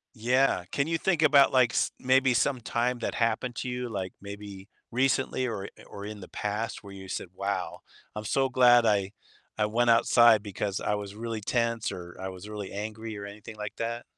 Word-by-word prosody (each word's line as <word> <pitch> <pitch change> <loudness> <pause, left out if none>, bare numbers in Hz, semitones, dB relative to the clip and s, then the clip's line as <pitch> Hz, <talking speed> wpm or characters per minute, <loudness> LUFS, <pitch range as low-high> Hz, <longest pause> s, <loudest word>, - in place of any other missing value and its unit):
Yeah. 125 -4 +2
Can 140 - +1
you 165 0 0
think 170 -2 +1
about, 145 -3 +6
like, 125 -2 +4
s - - +1
maybe 130 0 +3
some 130 +2 +1
time 120 +2 -1
that 120 - -3
happened 115 +1 0
to 130 - -3
you, 125 0 -3
like, 95 -4 -4
maybe 100 -1 -9 0.2
recently 130 +1 +1
or 100 -4 -4 0.2
or 100 - -9
in 105 0 -7
the 90 - -10
past 105 +2 -3
where 100 - -10
you 95 -1 -10
said, 90 - -4
"Wow, 100 +1 -3 0.3
I'm 105 0 -5
so 135 +3 +1
glad 120 -2 +6
I 100 -3 +2 0.4
I 105 - +2
went 120 +3 +1
outside 115 -1 +6
because 100 -1 -3
I 105 - 0
was 100 -1 -6
really 115 0 -4
tense," 115 +1 0
or, 85 -1 -8
"I 95 - -4
was 95 +2 -9
really 105 -2 -6
angry," 110 +2 -5
or 100 - -6
anything 105 +2 -10
like 105 0 -6
that? 115 +1 -3
110 Hz, 200 wpm, -28 LUFS, 100-125 Hz, 0.4 s, about